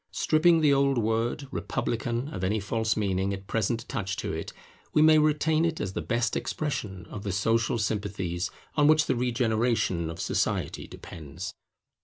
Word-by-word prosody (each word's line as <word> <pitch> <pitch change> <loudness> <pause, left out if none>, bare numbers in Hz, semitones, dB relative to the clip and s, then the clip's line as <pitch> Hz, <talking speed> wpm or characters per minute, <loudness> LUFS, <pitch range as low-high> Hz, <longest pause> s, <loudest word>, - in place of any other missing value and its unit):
Stripping 165 +1 +3
the 150 -2 +5
old 140 -1 +3
word 115 +5 0
Republican 120 +1 -2
of 95 - -4
any 105 +4 +1
false 110 +2 -1
meaning 100 -1 0
at 95 0 -11
present 115 +3 -1
attached 95 -5 -3
to - - -3
it, - - -4 0.4
we 150 - +4
may 155 0 +7
retain 155 +1 +2
it 165 -1 0
as 95 - -3
the 85 - -2
best 115 +9 0
expression 110 - -3
of 105 - -6
the 100 - -3
social 115 +5 +1
sympathies 100 -5 -2 0.3
on 145 -1 +4
which 155 0 +5
the 130 - +1
regeneration 115 -7 +1
of 80 - -7
society - - -1
depends. 80 +3 -8
115 Hz, 165 wpm, -27 LUFS, 100-140 Hz, 0.4 s, may